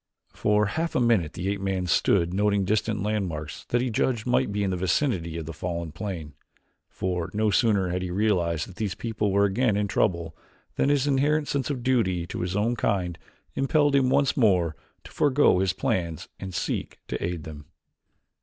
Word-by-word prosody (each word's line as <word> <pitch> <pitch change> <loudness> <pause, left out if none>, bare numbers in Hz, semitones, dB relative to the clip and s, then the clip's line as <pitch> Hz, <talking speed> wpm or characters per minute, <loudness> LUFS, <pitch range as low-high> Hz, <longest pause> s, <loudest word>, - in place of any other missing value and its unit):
For 105 0 +2
half 160 +11 -2
a - - +3
minute 115 -10 +2
the 90 - -4
ape 100 0 -2
man 95 -2 -1
stood 85 0 +2
noting 100 0 +2
distant 105 +1 0
landmarks 90 -8 -3
that 120 - 0
he 125 -1 -1
judged 115 0 0
might 125 -4 +1
be 100 0 -1
in 95 - 0
the - - 0
vicinity 90 - 0
of 80 - -5
the 80 - -6
fallen 85 0 -4
plane, 80 -5 -6 0.6
for 90 -2 -2
no 105 0 +2
sooner 100 -4 +2
had 90 +1 -2
he 90 - -3
realized 90 -5 0
that 95 - -13
these 105 -4 -2
people 110 -3 -2
were 100 +1 +4
again 100 +2 +1
in 105 0 0
trouble 85 -5 0 0.4
than 140 - +2
his 145 -2 +2
inherent 145 +2 +2
sense 140 -1 -1
of 130 -4 -3
duty 95 -10 +1
to - - -6
his 90 +1 -2
own 110 +4 +1
kind 90 -6 -1 0.3
impelled 145 +1 +2
him 130 -2 +3
once 140 +1 +2
more 90 - +3 0.3
to - - -13
forego 145 -8 +3
his 95 -1 +2
plans 85 -3 -2
and 95 -2 -6
seek - - -3
to - - -4
aid 85 -2 -3
them. 75 -2 -9
100 Hz, 190 wpm, -26 LUFS, 90-120 Hz, 0.6 s, were